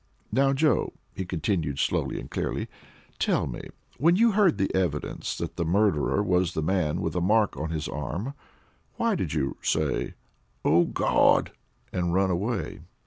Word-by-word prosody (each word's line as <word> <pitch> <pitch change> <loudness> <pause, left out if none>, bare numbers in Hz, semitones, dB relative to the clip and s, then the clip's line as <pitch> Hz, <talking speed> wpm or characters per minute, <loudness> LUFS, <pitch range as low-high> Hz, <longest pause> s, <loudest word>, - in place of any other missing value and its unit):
Now, 135 +1 +3
Joe," 140 -3 +2 0.2
he 95 - -4
continued, 80 -4 -1
slowly 75 - 0
and - - -8
clearly, - - -3 0.5
"tell - - +2
me, - - -6 0.3
when 165 +6 +5
you 230 +3 +5
heard 195 - +3
the 95 -1 0
evidence 85 -6 -1
that - - -5
the - - 0
murderer 100 +1 +2
was 90 -2 +1
the 80 - 0
man 85 -3 0
with - - -2
a 90 - +1
mark 105 +3 +3
on 80 - -3
his 80 0 -3
arm, 80 - -4 0.6
why 230 -1 +1
did 85 - -2
you 70 -3 -1
say, 75 -3 0 0.5
'Oh, 85 +3 +5
Gawd!' - - +3 0.4
and 90 -1 0
run 95 0 +3
away?" 95 -1 -2
90 Hz, 160 wpm, -27 LUFS, 80-110 Hz, 0.6 s, when